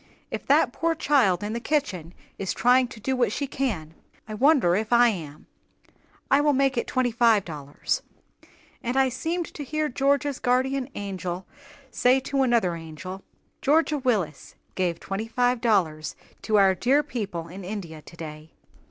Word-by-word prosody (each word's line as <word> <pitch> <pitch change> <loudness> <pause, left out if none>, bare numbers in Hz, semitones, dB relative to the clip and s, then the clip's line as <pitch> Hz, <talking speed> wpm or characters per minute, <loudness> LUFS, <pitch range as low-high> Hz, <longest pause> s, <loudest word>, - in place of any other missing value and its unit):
"If - - -5
that - - +4
poor 330 0 0
child 245 - +2
in 210 +1 -3
the 235 - -2
kitchen 200 - -2 0.2
is 195 - -2
trying 250 +1 +4
to 235 -3 -11
do 265 +5 -1
what 240 -5 +1
she 280 - -2
can, 215 - -3 0.3
I 215 - -6
wonder 250 - +4
if 215 +3 -2
I 240 0 +6
am. 155 -8 -6 0.9
I 275 - +5
will 295 0 +3
make 270 0 +2
it 235 - -1
twenty 255 -2 +1
five 225 -3 +3
dollars." 145 -4 -3 0.8
And 245 +3 -2
I 265 -1 +4
seemed 330 +7 -2
to 295 - -6
hear 305 +2 -1
Georgia's 280 +2 +1
guardian 260 +1 +1
angel 185 -2 -4 0.5
say 250 +3 +3
to 275 +1 -1
another 235 -9 +2
angel, 165 +4 -8 0.4
"Georgia 305 +1 +2
Willis 205 - -1 0.2
gave 175 -3 -1
twenty 200 +3 -4
five 245 +1 +1
dollars 160 -9 +1 0.3
to 215 - 0
our 195 -1 +5
dear 265 +10 +2
people 205 - -5
in 185 +3 -9
India 180 -5 -6
today." 155 -1 -10
230 Hz, 160 wpm, -25 LUFS, 180-265 Hz, 0.9 s, I